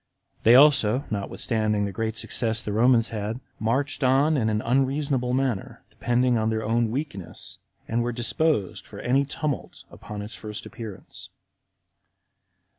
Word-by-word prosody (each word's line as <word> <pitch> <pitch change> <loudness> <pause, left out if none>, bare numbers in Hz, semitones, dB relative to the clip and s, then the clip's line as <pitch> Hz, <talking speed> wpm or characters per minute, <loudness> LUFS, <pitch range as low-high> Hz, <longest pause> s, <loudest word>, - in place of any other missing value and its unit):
They 115 +2 +7
also, 135 -3 +5
notwithstanding 105 0 0
the 100 - -3
great 110 +3 -3
success 115 0 0
the 105 - -4
Romans 115 +1 +4
had, 110 +2 -4 0.2
marched 135 +6 0
on 135 +4 +4
in 115 -6 +1
an 105 0 -1
unreasonable 135 0 +1
manner, 130 -6 -2
depending 120 0 +1
on 110 0 +1
their 110 0 -1
own 115 +1 +1
weakness, 125 - -5 0.3
and 115 +1 0
were 120 +1 -1
disposed 120 - 0
for - - -10
any 135 +3 +2
tumult 145 0 -4
upon 105 -1 -7
its 105 - -9
first 105 -1 -6
appearance. 110 -5 -8
120 Hz, 140 wpm, -25 LUFS, 110-130 Hz, 0.3 s, They